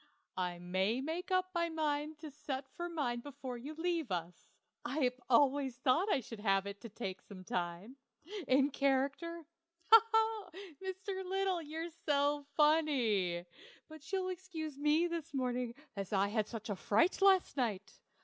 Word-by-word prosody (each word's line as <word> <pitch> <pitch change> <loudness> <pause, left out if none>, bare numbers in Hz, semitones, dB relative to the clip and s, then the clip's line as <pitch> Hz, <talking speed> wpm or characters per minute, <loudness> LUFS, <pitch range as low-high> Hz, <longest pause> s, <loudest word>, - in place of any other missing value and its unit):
I 180 -1 -1
may 190 +6 0
make 320 +6 -3
up 370 0 +1
my 340 -1 +1
mind 305 -1 -1
to 310 -2 -7
set 275 -2 -5
for 345 0 -3
mine 275 -8 -1
before 270 -1 -7
you 280 +6 -7
leave 330 -3 -1
us; 175 -1 -4 0.4
I've 255 -1 0
always 265 0 +3
thought 265 +11 +2
I 265 - +2
should 230 -1 -9
have 195 -2 +2
it 200 0 -6 0.2
taken 190 -5 -5
some 190 -2 -11
time. 180 +8 -4 0.5
In 270 +2 +4
character? 280 +5 0 0.5
He! 450 - +12 0.8
he! 380 - -8
Mr. 380 0 -5
Little, 380 -1 0
you're 320 +2 -5 0.2
so 285 0 +2
funny! 245 - +3 0.4
But 315 +1 -11
you'll 375 -1 0
excuse 340 -5 -5
me 300 +4 +3
this 330 -3 -4
morning, 250 -2 -1 0.2
as 195 -2 -4
I 200 0 +2
had 215 0 0
such 220 -2 -5
a - - -1
fright 225 - +2
last 385 -2 +5
night. 210 -7 -2
280 Hz, 155 wpm, -35 LUFS, 225-325 Hz, 0.8 s, He